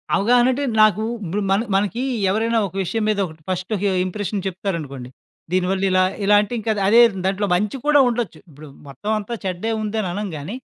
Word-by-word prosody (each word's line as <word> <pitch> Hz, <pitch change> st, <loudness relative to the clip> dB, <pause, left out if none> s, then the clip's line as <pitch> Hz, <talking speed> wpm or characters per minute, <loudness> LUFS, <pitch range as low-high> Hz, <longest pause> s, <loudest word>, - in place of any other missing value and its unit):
అవగాహనంటే 245 Hz, +5 st, +3 dB, 0.2 s
నాకు 215 Hz, 0 st, +4 dB, 0.2 s
ఇప్పుడు 190 Hz, +5 st, -2 dB
మన 195 Hz, +2 st, +3 dB
మనకీ 210 Hz, +5 st, 0 dB, 0.3 s
ఎవరైనా 225 Hz, +3 st, +1 dB
ఒక 190 Hz, -, -15 dB
విషయం 220 Hz, +5 st, -2 dB
మీద 215 Hz, -, +1 dB
ఒకటి 160 Hz, -2 st, -12 dB
ఫస్ట్ 185 Hz, +3 st, -3 dB
హి -, -, 0 dB
ఒక -, -, 0 dB
ఇంప్రెషన్ 205 Hz, +1 st, -3 dB
చెప్తారనుకోండి. 165 Hz, -9 st, -5 dB, 0.4 s
దీనివల్ల 185 Hz, +1 st, 0 dB
ఇలా, 185 Hz, 0 st, +4 dB, 0.2 s
ఇలా 205 Hz, +1 st, +5 dB
అంటే, 210 Hz, +3 st, -5 dB
ఇంకా 220 Hz, +1 st, -1 dB, 0.2 s
అదే 230 Hz, +3 st, +7 dB, 0.2 s
దాంట్లో 195 Hz, +2 st, 0 dB
మంచి 210 Hz, +7 st, -1 dB
కూడా 295 Hz, -1 st, +5 dB
ఉండొచ్చు. 230 Hz, -9 st, -3 dB
ఇప్పుడు 150 Hz, +1 st, -13 dB, 0.2 s
మొత్తం 140 Hz, +11 st, -5 dB
అంతా 215 Hz, +3 st, -5 dB
చెడ్డే 185 Hz, +4 st, -2 dB
ఉందని 215 Hz, -1 st, -2 dB
అనంగాని, 190 Hz, -1 st, -5 dB
200 Hz, 175 wpm, -21 LUFS, 180-220 Hz, 0.4 s, అదే